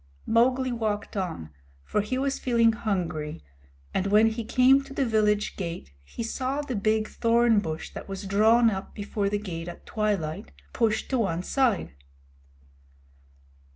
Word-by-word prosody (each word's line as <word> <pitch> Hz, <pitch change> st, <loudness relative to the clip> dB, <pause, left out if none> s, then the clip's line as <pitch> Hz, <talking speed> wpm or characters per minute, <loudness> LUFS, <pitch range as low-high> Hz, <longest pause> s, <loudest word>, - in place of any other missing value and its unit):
Mowgli 255 Hz, +3 st, +2 dB
walked 215 Hz, -4 st, -2 dB
on, 170 Hz, -, -4 dB, 0.3 s
for 210 Hz, -, 0 dB
he 235 Hz, +5 st, -3 dB
was 275 Hz, +1 st, -1 dB
feeling 230 Hz, -2 st, +3 dB
hungry, 170 Hz, -, -3 dB, 0.5 s
and 190 Hz, +1 st, 0 dB
when 210 Hz, +2 st, +5 dB
he 230 Hz, +1 st, -4 dB
came 255 Hz, +4 st, +4 dB
to 275 Hz, 0 st, -11 dB
the 275 Hz, -, +1 dB
village 215 Hz, -2 st, +1 dB
gate 170 Hz, -, -6 dB
he 70 Hz, -, -6 dB
saw 260 Hz, +5 st, -2 dB
the 260 Hz, -4 st, -4 dB
big 215 Hz, +1 st, +1 dB
thorn 230 Hz, -1 st, +3 dB
bush 160 Hz, -4 st, -5 dB
that -, -, -8 dB
was 195 Hz, +1 st, -5 dB
drawn 220 Hz, +4 st, +4 dB
up 190 Hz, -1 st, -6 dB
before 205 Hz, -1 st, -2 dB
the 205 Hz, -, 0 dB
gate 175 Hz, -5 st, -6 dB
at 175 Hz, -, -9 dB
twilight, 175 Hz, -, -2 dB, 0.2 s
pushed 220 Hz, -2 st, +1 dB
to 260 Hz, -, +2 dB
one 180 Hz, -5 st, 0 dB
side. 245 Hz, -, 0 dB
215 Hz, 155 wpm, -26 LUFS, 190-235 Hz, 0.5 s, when